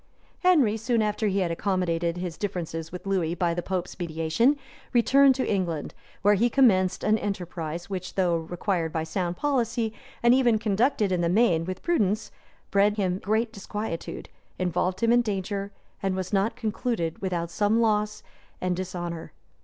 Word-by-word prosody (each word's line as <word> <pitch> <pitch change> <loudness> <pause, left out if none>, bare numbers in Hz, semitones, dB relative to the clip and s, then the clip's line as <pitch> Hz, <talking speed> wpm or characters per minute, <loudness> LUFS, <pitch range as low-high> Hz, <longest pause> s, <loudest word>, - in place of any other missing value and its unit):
] - - -34
{1162.} 365 - +4
Henry, 255 -12 +4
soon 225 -1 +1
after 210 +1 -1
he 195 0 +1
had 175 -2 0
accommodated 170 -2 0
his 175 -2 -4
differences 165 -5 -4
with 180 +2 -8
Lewis 180 -4 0
by 175 -2 +1
the 175 - -2
pope's 180 0 -4
mediation, 170 - +1 0.4
returned 265 +3 +5
to 260 - -1
England; 175 -6 -1 0.3
where 205 +1 +6
he 230 +4 +3
commenced 200 -8 +3
an 215 +1 +3
enterprise, 175 -4 -4
which, 185 -2 -5
though 180 -3 +2
required 170 0 -2
by 160 0 -1
sound 175 +2 -2
policy, 235 -6 0 0.3
and 240 0 +6
even 245 -4 +4
conducted 215 0 +1
in 180 -1 +1
the 170 - +1
main 175 -5 +3
with 185 +1 -5
prudence, 215 - +1 0.4
bred 205 +2 +3
him 185 -2 0
great 220 +3 0
disquietude, 205 -3 -5 0.3
involved 185 +1 -1
him 230 - +4
in 240 0 +5
danger, 200 -2 -3 0.3
and 195 -1 0
was 185 +1 -4
not 200 +4 +2
concluded 220 -7 -2
without 175 -3 -2
some 210 +5 +2
loss 210 -2 +1 0.4
and 180 -1 0
dishonor. 175 -3 -5
195 Hz, 170 wpm, -26 LUFS, 175-220 Hz, 0.4 s, where